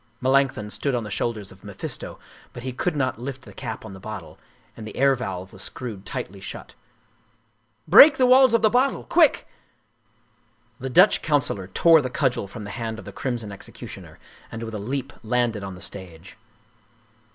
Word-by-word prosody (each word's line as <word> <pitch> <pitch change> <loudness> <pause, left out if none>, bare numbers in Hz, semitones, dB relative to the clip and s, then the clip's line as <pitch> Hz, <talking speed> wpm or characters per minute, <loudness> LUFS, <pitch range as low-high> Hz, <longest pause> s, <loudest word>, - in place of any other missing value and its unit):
Melanchthon 130 -5 +1
stood 140 +2 -1
on 120 - -1
the 105 - -7
shoulders 105 -2 -3
of 95 +2 -17
Mephisto, 100 -2 -6 0.4
but 120 - -9
he 130 -1 -4
could 165 +6 -1
not 130 -4 -1
lift 130 0 -6
the - - -13
cap - - -6
of 95 - -9
the 95 - -10
bottle, 95 -7 -8 0.4
and 110 -1 -8
the 110 - -9
air 140 +1 +5
valve 95 -7 -5
was 95 - -11
screwed 110 -5 -6
tightly 95 +2 -5
shut. 95 - -8 0.6
" 110 0 -41 0.3
Break 270 - +9
the 255 - +4
walls 255 -1 +6
of 230 - +1
the 215 - +6
bottle! 255 +2 +2
Quick! 325 -4 +3 0.6
" 115 0 -39
The 130 - -4
Dutch 180 +10 +5
councilor 140 - 0
tore 160 - +5
the 130 - -3
cudgel 125 -6 0
from 105 +2 -9
the 100 - -7
hand 110 +1 -4
of - - -10
the - - -9
crimson 120 -5 -3
executioner 100 - -10 0.3
and 115 - -6
with 110 -1 -6
a 105 - -4
leap 135 +5 -4
landed 115 -2 0
on 95 -1 -6
the 90 - -12
stage. 95 -3 -8
115 Hz, 190 wpm, -24 LUFS, 100-135 Hz, 0.6 s, Break